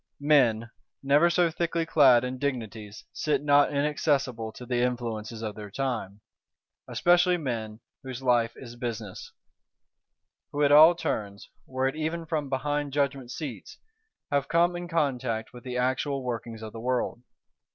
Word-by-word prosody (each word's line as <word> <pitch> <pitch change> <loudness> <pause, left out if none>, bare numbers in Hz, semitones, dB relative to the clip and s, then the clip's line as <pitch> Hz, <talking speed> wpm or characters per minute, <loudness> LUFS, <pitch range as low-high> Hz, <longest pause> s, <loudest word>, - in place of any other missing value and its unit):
Men, 140 -7 +4
though 115 - -10 0.4
never 145 +5 +4
so 175 -1 +2
thickly 170 0 -1
clad 135 -7 +5
in 125 0 -4
dignities, 110 -6 -4
sit 150 -1 -1
not 145 -1 +5
inaccessible 140 -5 0
to 125 - -10
the 125 0 -1
influences 115 -2 -3
of 110 -1 -3
their 105 0 -9
time; 110 -4 -3 0.7
especially 175 +1 +3
men 115 -7 -4 0.2
whose 130 -1 -7
life 120 -2 +2
is 120 -2 -10
business; 115 -5 -6 1.2
who 145 +1 0
at 145 - +4
all 155 +4 +8
turns, 105 -12 -4 0.2
were 130 0 -1
it 135 - -2
even 160 +2 -3
from 150 -3 -2
behind 145 +1 -2
judgment 140 -3 -1
seats, 125 - -7 0.5
have 140 -1 +1
come 170 +2 +2
in 175 0 -5
contact 130 -9 -1
with 120 -1 -11
the 125 -1 -4
actual 130 +2 -1
workings 115 -2 -5
of 110 - -8
the 115 - -7
world. 120 0 -1
130 Hz, 150 wpm, -27 LUFS, 115-150 Hz, 1.2 s, all